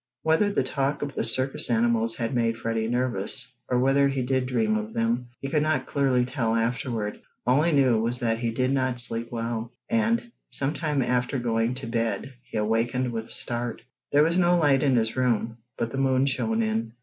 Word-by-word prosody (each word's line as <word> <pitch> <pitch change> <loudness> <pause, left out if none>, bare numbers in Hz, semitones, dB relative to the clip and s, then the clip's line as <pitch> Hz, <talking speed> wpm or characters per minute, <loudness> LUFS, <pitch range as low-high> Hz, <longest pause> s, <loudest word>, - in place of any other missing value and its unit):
Whether 160 +6 +3
the 200 - +1
talk 135 +2 -1
of 145 -1 -4
the - - -1
circus 130 +4 +1
animals 115 -1 +2
had 115 +2 -2
made 115 -2 +1
Freddie 115 -1 -1
nervous, 125 +1 -2 0.2
or 125 - +2
whether 135 +2 +4
he 135 -2 -1
did 130 0 0
dream 115 -4 +1
of 110 +1 -3
them, 115 +2 0
he 135 - -4
could 150 +2 +1
not 155 +1 0
clearly 130 -3 +1
tell 125 -3 -1
afterward. 115 -2 -2 0.2
All 125 +4 +4
he 170 +2 +2
knew 130 -6 +4
was 120 +2 0
that 115 -1 0
he 120 -1 -1
did 130 +3 0
not 130 -2 0
sleep 115 -1 +1
well, 115 0 -3 0.2
and, 230 +1 +1 0.2
some 140 +2 -1
time 150 -5 0
after 125 +2 0
going 115 0 0
to 135 - -4
bed 115 +3 -2
he 125 -2 -7
awakened 115 +4 0
with 110 -1 -4
a - - -20
start. 120 0 -3 0.3
There 145 +1 +5
was 170 +3 +2
no 175 0 +4
light 145 -5 +3
in 135 -3 +3
his 110 -1 +1
room, 120 -3 0 0.2
but 115 - -2
the 135 - -3
moon 130 0 +3
shone 220 - 0
in. 220 - -2
125 Hz, 205 wpm, -26 LUFS, 115-140 Hz, 0.3 s, There